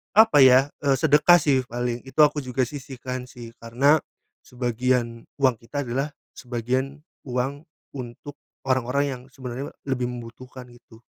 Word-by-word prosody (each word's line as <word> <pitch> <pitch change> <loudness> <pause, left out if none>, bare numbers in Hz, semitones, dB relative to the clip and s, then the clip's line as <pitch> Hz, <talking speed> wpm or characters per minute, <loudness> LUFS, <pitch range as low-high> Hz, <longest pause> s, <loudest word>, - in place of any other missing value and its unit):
apa, 220 -7 +6
ya, 130 +1 +6 0.2
eee, 140 -1 +3
sedekah, 160 +3 +6
sih, 140 -4 +2
paling, 120 0 -3
itu 130 +3 -9
aku 150 0 +3
juga 130 0 -1
sisihkan, 130 -2 -6
sih, 120 -2 -11
karena 135 +7 +3 0.4
sebagian 120 -1 -1 0.2
uang 130 -3 +3
kita 145 +5 -4
adalah 135 +5 -2 0.2
sebagian 130 +4 -3 0.2
uang 135 +5 -3 0.3
untuk 130 +2 -8 0.3
orang-orang 130 +2 +1
yang 130 -3 -5
sebenarnya 130 +1 -6 0.2
lebih 125 -2 -1
membutuhkan, 125 +2 -10
gitu. 120 -2 -18
130 Hz, 135 wpm, -24 LUFS, 120-140 Hz, 0.4 s, apa